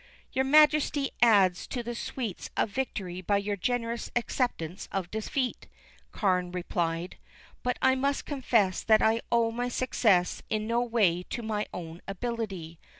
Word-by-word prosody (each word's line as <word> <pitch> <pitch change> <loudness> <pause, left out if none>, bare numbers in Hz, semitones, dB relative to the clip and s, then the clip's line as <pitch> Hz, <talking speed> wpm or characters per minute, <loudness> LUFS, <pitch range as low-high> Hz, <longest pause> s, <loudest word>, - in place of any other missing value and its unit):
"Your 265 -1 +1
Majesty 300 -1 +4
adds 200 -6 +4
to 245 -2 -4
the 240 +1 -4
sweets 235 -4 -5
of 205 - +1
victory 195 -8 -3
by 200 +3 +1
your 200 +1 -1
generous 235 +3 -2
acceptance 235 - -2
of 185 -3 -3
defeat," 245 +4 -2 0.4
Carne 180 -3 +1
replied 175 -1 -2 0.4
"But 250 - -1
I 260 - +6
must 275 +2 0
confess 230 - +1
that 220 -1 +5
I 225 +1 +3
owe 230 -1 +3
my 245 +2 -2
success 215 -7 +2
in 215 0 -1
no 235 +2 +1
way 215 -8 +2
to 240 - -4
my 215 -1 -2
own 170 -1 -7
ability. 195 -6 -4
220 Hz, 150 wpm, -28 LUFS, 185-245 Hz, 0.4 s, I